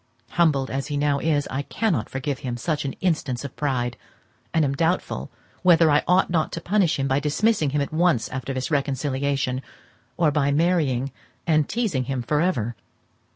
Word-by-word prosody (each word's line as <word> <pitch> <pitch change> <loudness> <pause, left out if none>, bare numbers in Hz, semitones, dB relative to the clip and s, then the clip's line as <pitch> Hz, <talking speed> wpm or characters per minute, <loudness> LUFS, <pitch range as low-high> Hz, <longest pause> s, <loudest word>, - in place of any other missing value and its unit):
Humbled 150 -6 +2
as 135 +1 -2
he 145 -1 -2
now 145 -1 +1
is, 145 -2 +1
I 135 - -1
cannot 170 - -1
forgive 135 0 -3
him 125 -2 -4
such 150 +3 -2
an 135 - -2
instance 150 -8 -1
of 140 - -8
pride, 125 -5 -1 0.5
and 160 -2 +2
am 140 - 0
doubtful 165 +6 -1 0.3
whether 165 -3 +5
I 145 - +4
ought 180 0 +3
not 160 -3 +1
to - - -3
punish 185 -1 +1
him 135 -1 0
by 135 0 +2
dismissing 155 +3 +1
him 145 +1 0
at 140 - -3
once 165 -7 +2
after 130 +1 -4
this 130 +3 -3
reconciliation, 140 -2 0 0.6
or 165 -3 +3
by 140 -1 +1
marrying 145 -5 +1 0.3
and 155 -3 +2
teazing 205 - 0
him 130 -1 -2
for 150 +4 +1
ever. 120 - 0
145 Hz, 180 wpm, -24 LUFS, 135-165 Hz, 0.6 s, whether